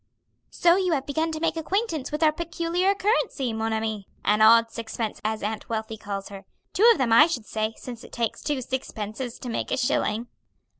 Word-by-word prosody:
"So 345 +1 +4
you 370 -3 +1
have 270 -3 -1
begun 315 +3 -1
to 315 - -4
make 330 +1 0
acquaintance 330 - -2
with 300 +2 -1
our 310 - +6
peculiar 340 +4 0
currency, 390 - 0
mon 220 0 -2
ami! 220 -2 -2 0.2
An 210 +1 +3
odd 230 +1 +6
sixpence 225 -1 -4
as 215 0 -2
Aunt 215 +1 -4
Wealthy 220 -1 -3
calls 200 -1 -6
her. 195 -1 -9 0.3
Two 445 +5 +6
of - - +3
them 250 -5 +2
I 300 +7 +8
should 250 -10 -3
say, 220 0 -2
since 240 -2 -9
it - - -13
takes 230 -2 -2
two 280 -3 -2
sixpences 240 -1 -5
to 255 - -8
make 230 - -3
a - - 0
shilling." 235 -3 0
245 Hz, 200 wpm, -25 LUFS, 220-320 Hz, 0.3 s, I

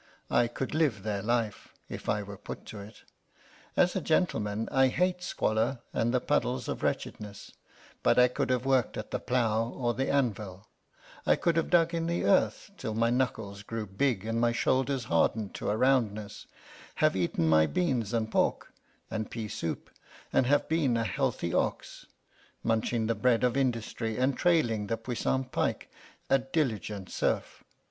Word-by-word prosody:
I 120 - +4
could 130 +4 -4
live 145 -11 +1
their 105 -2 -2
life, 115 -2 -2
if - - -6
I 105 0 +1
were 100 0 -8
put - - -8
to 110 - -8
it. 100 +2 -12 0.7
As 180 0 +4
a 190 - 0
gentleman, 115 - 0
I 135 0 +5
hate 180 +6 0
squalor 110 -7 0 0.2
and 115 +1 +1
the 125 - +2
puddles - - 0
of - - -3
wretchedness 100 -1 -4 0.5
but - - +3
I 125 0 +7
could 125 - -2
have 125 0 +1
worked 130 -3 +2
at 105 - -6
the - - -1
plough 115 -3 +1
or 120 -1 -1
the 135 +3 -1
anvil; 105 -7 -1 0.6
I - - +6
could 170 - +1
have 165 - +1
dug 170 -1 +4
in 165 0 -1
the 170 +1 -1
earth 195 +1 +2
till 110 -4 -4
my 115 +1 +2
knuckles 110 -6 -1
grew 110 +1 -4
big 105 +1 0
and 115 +1 -1
my 120 0 +3
shoulders 130 +2 +1
hardened 100 +3 +1
to - - -3
a 105 - +1
roundness, 110 -5 +1 0.5
have - - +3
eaten 85 -3 0
my 80 0 +5
beans 130 - 0
and 110 -2 -1
pork - - 0 0.4
and 110 -1 -3
pea 115 -2 -4
soup, 85 -5 -4 0.4
and 125 - +3
have 145 +2 +3
been 150 -7 +2
a 115 - +1
healthy 100 -5 -1
ox, - - -2 0.6
munching 115 0 +1
the 115 - +1
bread 115 +2 +2
of 125 0 +2
industry 115 -4 -1
and 130 +1 +2
trailing 120 - +2
the 115 - -1
puissant 125 +2 -2
pike, - - -1 0.4
a 135 - +4
diligent 110 - -2
serf. - - -1
115 Hz, 170 wpm, -29 LUFS, 105-135 Hz, 0.7 s, I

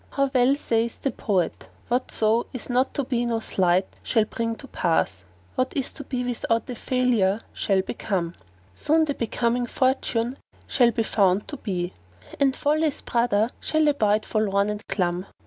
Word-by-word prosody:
How 275 -1 0
well 255 +1 +4
saith 230 -4 -1
the 275 - +1
poet, 185 -6 -1 0.2
"Whatso 235 -2 +1
is 255 0 -5
not 255 +2 +1
to 280 - 0
be 245 -2 0
no 235 -1 0
sleight 185 -3 +2 0.2
shall 220 -3 +2
bring 230 +1 -2
to 270 - -12
pass; 130 - 0
* 90 +1 -31
What 255 0 0
is 270 - 0
to 285 - -8
be 255 -2 -3
without 230 -2 -1
a 250 - -4
failure 235 -5 +1
shall 195 -2 +1
become; 185 -5 -2 0.4
Soon 315 - +2
the 290 - -1
becoming 240 0 0
fortune 255 -1 0 0.3
shall 245 -3 +4
be 230 0 0
found 200 -2 +2
to 290 - -5
be, 180 -6 -3 0.2
* 90 - -16
And 275 -2 +3
Folly's 305 0 0
brother[FN#453] 235 -1 +1
shall 310 -1 +1
abide 215 -6 +2
forlorn 205 -1 +1
and 210 0 -5
glum." 180 -1 -1
230 Hz, 170 wpm, -25 LUFS, 200-255 Hz, 0.4 s, well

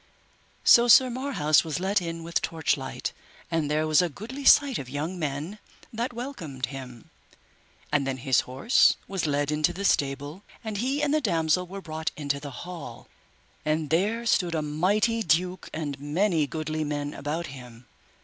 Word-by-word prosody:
So 240 0 +7
Sir 255 +2 +7
Marhaus 235 - +2
was 160 0 -3
let 195 +2 +1
in 165 -1 -5
with 170 0 -1
torchlight, 150 -4 -2 0.4
and 160 -3 0
there 155 +1 +1
was 155 0 +4
a 175 - 0
goodly 235 - -8
sight 280 -3 +6
of 130 - -7
young 155 +7 -4
men 155 +7 -4 0.3
that 235 +3 -2
welcomed 205 - -5
him. 125 -2 -10 0.8
And 145 -2 +1
then 135 -1 -2
his 130 0 +2
horse 135 - +4
was 190 -5 -2
led 145 0 0
into 150 0 +1
the 200 +2 -4
stable, 145 +3 0 0.2
and 220 -2 -4
he 270 +7 0
and 295 0 +1
the 310 - +2
damosel 175 - +1
were 195 +2 -7
brought 160 -2 -3
into 140 -2 -2
the 145 0 -7 0.2
hall, 160 -10 -9 0.5
and 155 0 -1
there 210 +8 +1
stood 175 -7 +2
a 155 - -1
mighty 205 +10 +1
duke 180 0 0
and 145 -3 -4
many 160 +2 +1
goodly 155 0 -3
men 145 -1 -3
about 155 +4 -3
him. 125 -2 -12
160 Hz, 170 wpm, -26 LUFS, 145-200 Hz, 0.8 s, So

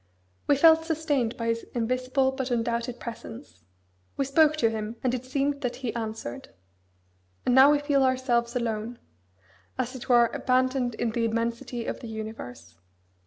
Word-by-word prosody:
We 285 - +5
felt 320 +2 +6
sustained 295 -7 -1
by 230 - -3
His 230 0 -1
invisible 255 +3 +1
but 265 -1 -4
undoubted 235 0 -1
presence. 115 - -9 0.5
We 275 - +1
spoke 305 +3 +4
to 230 -6 +2
Him, 220 +1 -4
and 250 -1 +1
it 255 0 -3
seemed 280 +2 -1
that 250 -2 -2
He 250 -4 -4
answered. 220 - -5 1.0
And 250 - +3
now 265 +2 +8
we 295 - +4
feel 290 -1 +1
ourselves 255 -2 +1
alone 230 -1 -2 0.8
as 255 0 -2
it 260 0 -9
were 240 -1 +5
abandoned 255 -1 +1
in 230 0 -1
the 230 0 0
immensity 230 +1 -2
of - - -4
the 235 - -8
universe. 125 - -8
245 Hz, 160 wpm, -27 LUFS, 230-265 Hz, 1.0 s, now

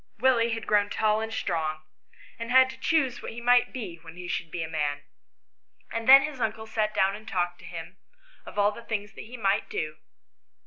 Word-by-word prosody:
Willie 235 -1 +3
had 225 - -6
grown 205 -1 +3
tall 215 0 +1
and 225 0 -4
strong, 155 -7 -2 0.6
and 230 0 -5
had 260 +1 +6
to 260 - -13
choose 265 -4 +1
what - - -6
he 235 - -7
would 245 0 +4
be 210 -10 -6
when 165 +1 -13
he 180 0 -7
should 170 -1 -3
be 170 +1 -3
a - - -4
man; 145 -2 -2 0.9
and 230 +2 -2
then 275 +1 +10
his 295 -4 -5
uncle 220 0 -2
sat 220 -1 -1
down 195 0 +3
and 215 +1 -12
talked 175 -1 -1
to - - -13
him 170 +2 -8 0.5
of - - -11
all 205 0 +4
the 215 - -10
things 210 -3 -4
that - - -9
he 245 +3 -9
might 200 -3 +1
do. 155 0 -3
215 Hz, 215 wpm, -27 LUFS, 175-235 Hz, 0.9 s, then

